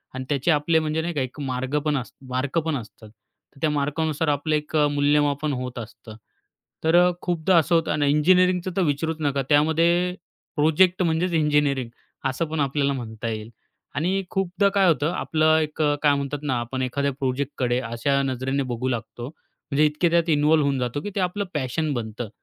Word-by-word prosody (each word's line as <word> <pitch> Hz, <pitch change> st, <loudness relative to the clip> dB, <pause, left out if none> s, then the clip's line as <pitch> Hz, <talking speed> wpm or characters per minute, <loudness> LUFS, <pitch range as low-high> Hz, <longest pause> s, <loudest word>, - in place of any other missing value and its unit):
आणि 130 Hz, 0 st, -5 dB
त्याचे 145 Hz, +3 st, +1 dB
आपले, 160 Hz, +2 st, +2 dB
म्हणजे 155 Hz, 0 st, -1 dB
नाही 170 Hz, +1 st, -3 dB
का, 145 Hz, -, -1 dB
एक 130 Hz, +3 st, -5 dB
मार्ग 130 Hz, +1 st, -2 dB
पण 150 Hz, -1 st, +1 dB
अस 125 Hz, -, -5 dB, 0.2 s
मार्क 130 Hz, +4 st, -2 dB
पण 160 Hz, -2 st, 0 dB
असतात. 110 Hz, -2 st, -11 dB, 0.5 s
तर -, -, -17 dB
त्या 155 Hz, -, +2 dB
मार्कानुसार 150 Hz, +2 st, -1 dB
आपलं 150 Hz, +2 st, 0 dB
एक 150 Hz, +1 st, -4 dB
अ, 150 Hz, -1 st, +4 dB
मूल्यमापन 145 Hz, 0 st, +1 dB
होत 125 Hz, -1 st, -5 dB
असतं, 110 Hz, -1 st, -10 dB, 0.7 s
तर 160 Hz, +1 st, +3 dB
अ, 180 Hz, +1 st, +6 dB
खूपदा 175 Hz, 0 st, +1 dB
असं 165 Hz, +1 st, +3 dB
होतं. 165 Hz, -1 st, +1 dB
आणि 145 Hz, -1 st, +1 dB
इंजिनिअरिंगचं 180 Hz, +4 st, +3 dB
तर -, -, +3 dB
विचारूच 160 Hz, +1 st, -1 dB
नका, 140 Hz, -2 st, 0 dB
त्यामध्ये 165 Hz, +4 st, +3 dB, 0.4 s
प्रोजेक्ट 175 Hz, +5 st, +3 dB
म्हणजेच 170 Hz, +1 st, 0 dB
इंजिनिअरिंग, 145 Hz, -5 st, +1 dB, 0.4 s
असं 130 Hz, +6 st, -2 dB
पण 160 Hz, 0 st, -4 dB
आपल्याला 140 Hz, 0 st, +1 dB
म्हणता 115 Hz, -3 st, -6 dB
येईल. 110 Hz, 0 st, -5 dB, 0.5 s
आणि 185 Hz, +7 st, 0 dB
खूपदा 195 Hz, +1 st, +1 dB
काय 195 Hz, -1 st, +3 dB
होतं, 155 Hz, -1 st, +2 dB
आपलं 155 Hz, 0 st, +2 dB
एक 155 Hz, 0 st, -3 dB
अ, 145 Hz, -1 st, +3 dB
काय 145 Hz, -1 st, +5 dB
म्हणतात 140 Hz, +1 st, -3 dB
ना, 130 Hz, -5 st, 0 dB
आपण 120 Hz, +2 st, -4 dB
एखाद्या 140 Hz, +2 st, -1 dB
प्रोजेक्टकडे 130 Hz, -2 st, -1 dB
अशा 130 Hz, +3 st, 0 dB
नजरेने 135 Hz, +1 st, -1 dB
बघू 125 Hz, +2 st, -3 dB
लागतो, 120 Hz, 0 st, -5 dB
म्हणजे 150 Hz, 0 st, -3 dB
इतके, 150 Hz, +3 st, +1 dB
त्यात 170 Hz, 0 st, +2 dB
इन्वॉल्व 150 Hz, 0 st, +3 dB
होऊन 140 Hz, -2 st, 0 dB
जातो 125 Hz, +3 st, -2 dB
की 205 Hz, -, -5 dB
ते, -, -, 0 dB
आपलं 190 Hz, +2 st, -1 dB
पॅशन 150 Hz, +2 st, -1 dB
बनतं, 115 Hz, -2 st, -5 dB
145 Hz, 185 wpm, -24 LUFS, 130-160 Hz, 0.7 s, अ